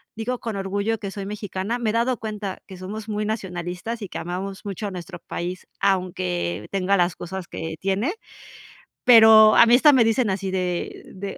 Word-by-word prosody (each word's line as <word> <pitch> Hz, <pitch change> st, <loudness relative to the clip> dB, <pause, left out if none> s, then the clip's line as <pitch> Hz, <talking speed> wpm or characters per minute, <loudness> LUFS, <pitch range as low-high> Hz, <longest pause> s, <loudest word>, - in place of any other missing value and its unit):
digo 235 Hz, +3 st, -3 dB
con 225 Hz, -3 st, -4 dB
orgullo 200 Hz, +3 st, -1 dB
que 200 Hz, -, -5 dB
soy 200 Hz, -1 st, -6 dB
mexicana, 205 Hz, +2 st, -4 dB
me 230 Hz, -2 st, 0 dB
he -, -, -6 dB
dado 235 Hz, +2 st, +1 dB
cuenta 210 Hz, -3 st, -5 dB
que 190 Hz, -, -10 dB
somos 210 Hz, +4 st, -7 dB
muy 210 Hz, 0 st, -2 dB
nacionalistas 190 Hz, +1 st, -4 dB
y 200 Hz, -, -6 dB
que -, -, -6 dB
amamos 190 Hz, +3 st, -5 dB
mucho 205 Hz, +1 st, -4 dB
a -, -, -5 dB
nuestro 180 Hz, -1 st, -8 dB
país, 180 Hz, +2 st, -6 dB
aunque 100 Hz, -, -1 dB
tenga 195 Hz, 0 st, +1 dB
las 175 Hz, 0 st, +1 dB
cosas 180 Hz, 0 st, -7 dB
que 160 Hz, 0 st, -5 dB
tiene, 195 Hz, -, 0 dB, 0.9 s
pero, 220 Hz, -2 st, +8 dB
a -, -, +8 dB
mí 235 Hz, +1 st, +6 dB
hasta 290 Hz, +4 st, +6 dB
me 255 Hz, -3 st, +5 dB
dicen 225 Hz, 0 st, +2 dB
así 190 Hz, 0 st, -2 dB
de 180 Hz, -2 st, -3 dB
de, 195 Hz, +1 st, -6 dB
195 Hz, 190 wpm, -23 LUFS, 185-220 Hz, 0.9 s, pero